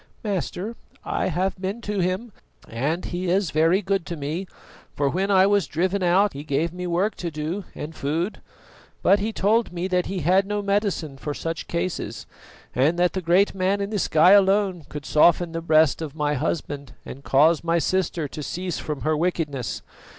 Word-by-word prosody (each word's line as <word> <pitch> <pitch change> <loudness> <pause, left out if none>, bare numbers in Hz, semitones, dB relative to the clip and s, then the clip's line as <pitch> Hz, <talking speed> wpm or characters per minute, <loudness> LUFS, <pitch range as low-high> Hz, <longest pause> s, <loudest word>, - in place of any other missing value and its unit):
"Master, 205 +1 -3 0.3
I - - -1
have 185 +2 -1
been 195 +4 -3
to 205 -3 -3
him, 185 +6 -1 0.4
and 145 +10 -2
he 180 +1 -3
is 190 -1 +1
very 165 +6 +3
good 195 -1 0
to 170 - -5
me, 155 +6 -4 0.5
for 140 - +1
when 190 +7 0
I 190 -1 +5
was 200 -5 +2
driven 185 +6 0
out 185 +3 +3
he 140 - -7
gave 155 +3 -1
me 180 0 -5
work 180 +5 +1
to 175 - -3
do 160 +5 -4
and 155 +2 -6
food. 160 +8 -2 0.6
But 200 - +5
he 215 +3 -1
told 220 +3 +1
me 175 +1 -3
that 180 -1 +1
he 190 -2 -3
had 185 +5 +3
no 210 0 -2
medicine 200 -8 -1
for 150 0 -4
such 165 -1 -4
cases, 170 +1 -3 0.5
and 145 +7 +2
that 180 0 +2
the 190 - -2
Great 180 +4 +3
Man 195 +1 0
in 200 +1 -3
the 210 - -1
sky 160 +1 +5
alone 195 -3 +4
could 150 -2 -7
soften 170 +2 +4
the 165 0 -4
breast 160 -2 +3
of 155 -2 -5
my 150 -1 0
husband 140 -1 -3
and 140 - -9
cause 155 +5 +4
my 170 0 +2
sister 170 -2 0
to 150 - -7
cease 180 +4 -4
from 150 -2 -5
her 155 0 +1
wickedness. 150 -6 -2
175 Hz, 190 wpm, -24 LUFS, 155-195 Hz, 0.6 s, I